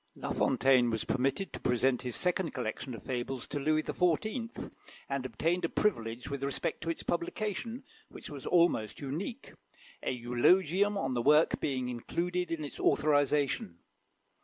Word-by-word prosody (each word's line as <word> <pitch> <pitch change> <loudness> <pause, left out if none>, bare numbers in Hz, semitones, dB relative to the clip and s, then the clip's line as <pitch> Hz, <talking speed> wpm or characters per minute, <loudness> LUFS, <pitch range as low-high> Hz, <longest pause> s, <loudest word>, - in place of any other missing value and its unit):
La - - -4
Fontaine 130 -2 +4
was 110 -2 -1
permitted 135 +9 -1
to - - -5
present 125 +1 +2
his 125 -1 -3
second 180 -1 0
collection 125 0 -4
of 110 - -11
fables 125 0 -3
to 145 - -3
Louis 155 +2 +2
XIV., 215 - -1 0.4
and 135 -2 -2
obtained 165 +9 0
a 170 - +1
privilege 115 - -1
with 140 -1 -4
respect 140 -1 -1
to 165 - -3
its 165 - -3
publication 215 +7 -3 0.3
which - - -10
was 140 -3 -8
almost 170 - +2
unique; 165 - -5 0.5
a - - -2
eulogium 175 +11 +3
on 135 -9 -1
the 120 - 0
work 150 +5 +4
being 130 -3 -1
included 175 +9 -2
in 165 -2 -2
its 145 - -9
authorisation. 145 - +2
145 Hz, 155 wpm, -31 LUFS, 125-175 Hz, 0.5 s, Fontaine